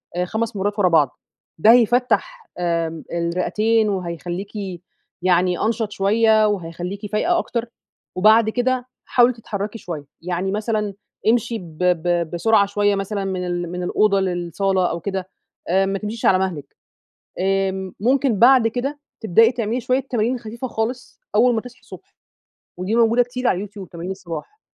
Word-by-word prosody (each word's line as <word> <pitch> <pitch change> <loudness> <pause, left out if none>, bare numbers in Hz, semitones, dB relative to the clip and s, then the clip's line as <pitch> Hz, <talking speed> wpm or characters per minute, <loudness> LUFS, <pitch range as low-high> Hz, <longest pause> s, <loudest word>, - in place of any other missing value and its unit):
آآ 180 0 0
5 220 +3 -3
مرّات 205 +2 -2
ورا 185 -3 +4
بعض، 150 -6 +2 0.4
ده 215 +8 +6
هيفَتّح 250 - +2
آمم 165 -2 -1
الرئتين 210 +6 +1
وهيخليكِ 180 +1 -4 0.4
يعني 180 0 +2
أنشط 225 -1 0
شوية، 215 +2 +3
وهيخليكِ 185 +1 -4
فايقة 340 +12 +2
أكتر، 235 -5 -3 0.5
وبعد 215 +3 +5
كده 250 +1 0 0.2
حاولي 245 0 +4
تتحركي 210 -2 -5
شوية، 160 -8 -7 0.2
يعني 180 +2 -2
مثلًا 210 -1 -1 0.3
امشي 230 0 +2
ب 165 -5 -12
ب 175 -1 +1
بسرعة 200 +4 +3
شوية 205 0 +1
مثلًا 195 0 -3
من 185 -1 -2
ال 175 -1 -3
من 180 0 -4
الأوضة 200 +2 +2
للصالة 185 +1 0
أو 170 - -3
كده، 190 -1 -4 0.4
آآ 190 +3 +3
ما 195 0 -2
تمشيش 220 +2 -5
على 185 - +5
مهلِك، 170 -7 -4 0.6
آمم، 190 0 0
ممكن 255 -1 +2
بعد 245 -1 +6
كده 265 +5 -3 0.2
تبدئي 225 +2 +5
تعملي 235 0 -2
شوية 255 +3 +1
تمارين 245 -1 -1
خفيفة 235 +2 -6
خالص 235 +1 -4 0.2
أول 240 +2 +4
ما 220 - 0
تصحي 250 +1 -13
الصبح، 390 - -14 0.6
ودي 185 +5 -1
موجودة 235 +1 +4
كتير 250 +1 -3
على - - +3
اليوتيوب، 200 0 -7
تمارين 175 +2 -6
الصباح، 190 - -7
205 Hz, 150 wpm, -21 LUFS, 180-230 Hz, 0.6 s, ده